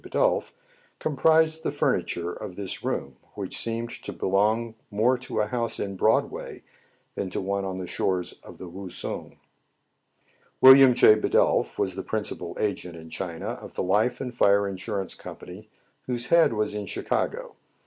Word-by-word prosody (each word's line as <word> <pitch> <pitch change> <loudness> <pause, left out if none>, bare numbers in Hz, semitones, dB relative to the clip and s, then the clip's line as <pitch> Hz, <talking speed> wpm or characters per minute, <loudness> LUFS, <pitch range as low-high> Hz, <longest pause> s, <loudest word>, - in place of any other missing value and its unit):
Bidulph, - - +1 0.5
comprised 160 +2 +3
the - - -1
furniture 85 0 -1
of 90 - -8
this 100 -1 -6
room, 70 -2 -3 0.2
which - - -5
seemed 115 +1 -2
to - - -6
belong 110 +4 +1 0.2
more 110 +5 +2
to 130 - -4
a - - +1
house 115 +1 -1
in 100 -1 -3
Broadway - - 0 0.5
than 95 - -3
to - - -3
one 100 +1 -2
on 95 -1 -4
the 95 - -4
shores 90 0 -1
of - - -12
the 90 - -8
Wousung. 95 +1 -7 1.2
William 130 -1 +9
J. 110 - +8
Bidulph 110 - +2
was 95 - 0
the 95 - -4
principal 105 -5 -4
agent 95 -4 -2
in 80 -1 -11
China 85 -2 -5
of - - -11
the - - -1
life 105 +6 +1
and 125 -2 -5
fire 100 -3 +3
insurance 95 0 -4
company 100 +5 -10 0.4
whose 120 -1 -3
head 170 -7 +5
was 105 -1 -1
in 105 -1 -4
Chicago. - - -2
100 Hz, 160 wpm, -26 LUFS, 95-120 Hz, 1.2 s, William